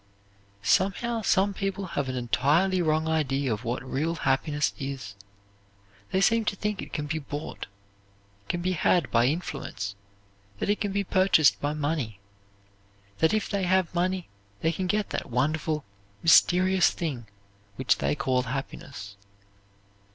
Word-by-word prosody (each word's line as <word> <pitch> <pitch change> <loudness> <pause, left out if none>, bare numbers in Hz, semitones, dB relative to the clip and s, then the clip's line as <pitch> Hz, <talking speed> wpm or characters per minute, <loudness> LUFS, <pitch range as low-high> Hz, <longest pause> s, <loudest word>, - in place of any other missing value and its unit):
Somehow 225 - +1
some 200 -1 +2
people 195 0 -3
have 145 -6 -2
an 130 - -3
entirely 150 +10 +2
wrong 155 -1 +1
idea 140 -5 +1
of 110 +3 -5
what 120 +2 -2
real 150 +6 -1
happiness 145 +1 0
is. 135 -7 -5 1.0
They 190 - +2
seem 230 +3 +4
to 205 - 0
think 210 0 -2
it - - -9
can 150 - -3
be 155 +2 -2
bought, 145 +1 -6 0.8
can 175 0 -1
be 185 - +1
had 175 -3 +2
by 120 +1 +4
influence, 135 - -3 0.6
that 200 - 0
it 205 - -1
can 205 -2 0
be 200 +1 0
purchased 185 -5 +4
by 145 +1 0
money; 145 - -2 1.0
that 160 - +4
if 215 -1 0
they 195 -2 -1
have 185 -1 +2
money 180 +1 0 0.3
they 160 - +2
can 185 +3 -3
get 210 +2 0
that - - -3
wonderful, 150 +4 0 0.4
mysterious 180 +2 +5
thing 135 -9 -4 0.5
which - - +1
they 70 +1 +1
call 130 -1 +1
happiness. 125 -5 -6
160 Hz, 145 wpm, -27 LUFS, 135-185 Hz, 1.0 s, mysterious